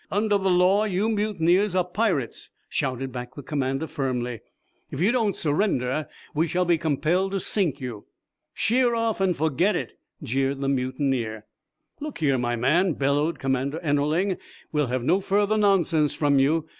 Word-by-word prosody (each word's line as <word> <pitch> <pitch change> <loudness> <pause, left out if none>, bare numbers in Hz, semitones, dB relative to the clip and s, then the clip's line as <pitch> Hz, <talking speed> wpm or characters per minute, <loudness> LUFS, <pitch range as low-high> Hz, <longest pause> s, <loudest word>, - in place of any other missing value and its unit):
"Under 205 0 +1
the 190 0 0
law 185 +4 +4
you 205 +2 0
mutineers 205 -3 +1
are 185 - +3
pirates," 180 - -1 0.2
shouted 130 0 -2
back 125 -1 -7
the 145 - -8
commander, 135 +1 -2
firmly. 125 -5 -3 0.5
"If 135 - -6
you 195 +7 +3
don't 225 -6 +1
surrender 150 -4 0 0.3
we 160 +3 +1
shall 180 +2 0
be 170 -2 +2
compelled 170 +5 0
to 195 - 0
sink 175 -7 0
you." 120 -6 -7 0.5
"Sheer 240 +1 +2
off 230 -3 -1
and 185 -3 +1
forget 160 +6 +1
it!" 130 -9 -5 0.2
jeered 135 +3 -1
the 135 0 -1
mutineer. 130 -4 -1 0.5
"Look 300 0 -6
here, 140 -5 +1
my 120 0 0
man," 155 +10 +2
bellowed 145 +4 0
Commander 135 +3 -1
Ennerling, 155 +6 +1 0.3
"we'll 150 -3 +1
have 125 0 -2
no 170 +9 +3
further 205 +2 +1
nonsense 175 -8 +2
from 145 -2 +2
you. 155 +4 +2
155 Hz, 160 wpm, -25 LUFS, 135-195 Hz, 0.5 s, law